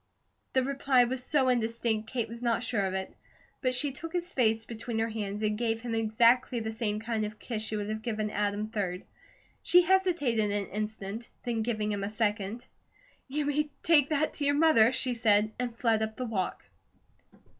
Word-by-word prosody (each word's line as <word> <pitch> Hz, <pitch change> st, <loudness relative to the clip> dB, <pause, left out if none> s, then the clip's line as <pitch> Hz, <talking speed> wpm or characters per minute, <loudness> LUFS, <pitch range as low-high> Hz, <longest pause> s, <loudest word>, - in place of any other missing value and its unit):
The 260 Hz, -, +3 dB
reply 270 Hz, -1 st, +3 dB
was 250 Hz, +1 st, -2 dB
so 275 Hz, -1 st, +2 dB
indistinct 230 Hz, -2 st, 0 dB
Kate 235 Hz, -3 st, -2 dB
was 230 Hz, +1 st, -9 dB
not 235 Hz, -1 st, +1 dB
sure 215 Hz, -5 st, 0 dB
of 190 Hz, -, -3 dB
it; 190 Hz, 0 st, -4 dB, 0.5 s
but 255 Hz, -1 st, +1 dB
she 280 Hz, +3 st, +2 dB
took 320 Hz, +6 st, -7 dB
his 355 Hz, 0 st, -2 dB
face 225 Hz, -3 st, +2 dB
between 230 Hz, 0 st, -5 dB
her 225 Hz, +1 st, 0 dB
hands 210 Hz, -1 st, -4 dB
and 210 Hz, 0 st, +1 dB
gave 225 Hz, 0 st, -1 dB
him 235 Hz, -1 st, -4 dB
exactly 235 Hz, +3 st, +3 dB
the 220 Hz, 0 st, -3 dB
same 220 Hz, -2 st, -2 dB
kind 220 Hz, 0 st, -2 dB
of 210 Hz, 0 st, -5 dB
kiss 225 Hz, -1 st, -4 dB
she 220 Hz, 0 st, -3 dB
would 205 Hz, -1 st, -3 dB
have 215 Hz, 0 st, -3 dB
given 215 Hz, -2 st, -2 dB
Adam, 205 Hz, +1 st, -1 dB
3d. 195 Hz, -5 st, -3 dB, 0.6 s
She 355 Hz, 0 st, +5 dB
hesitated 335 Hz, -, +2 dB
an 205 Hz, 0 st, -1 dB
instant, 210 Hz, +2 st, -5 dB
then 235 Hz, -2 st, -1 dB
gave 220 Hz, -1 st, -2 dB
him 210 Hz, -1 st, -1 dB
a 200 Hz, -, -2 dB
second. 210 Hz, +1 st, -2 dB, 0.6 s
"You 290 Hz, +2 st, -2 dB
may 300 Hz, +1 st, 0 dB
take 295 Hz, -4 st, +5 dB
that 310 Hz, 0 st, +1 dB
to 295 Hz, -, -2 dB
your 285 Hz, 0 st, +3 dB
mother," 290 Hz, -7 st, +5 dB
she 255 Hz, -1 st, 0 dB
said, 215 Hz, -2 st, +3 dB
and 240 Hz, -2 st, -3 dB
fled 225 Hz, -3 st, +2 dB
up 220 Hz, 0 st, -2 dB
the 255 Hz, -, -3 dB
walk. 205 Hz, -6 st, -3 dB
225 Hz, 195 wpm, -29 LUFS, 215-255 Hz, 0.6 s, She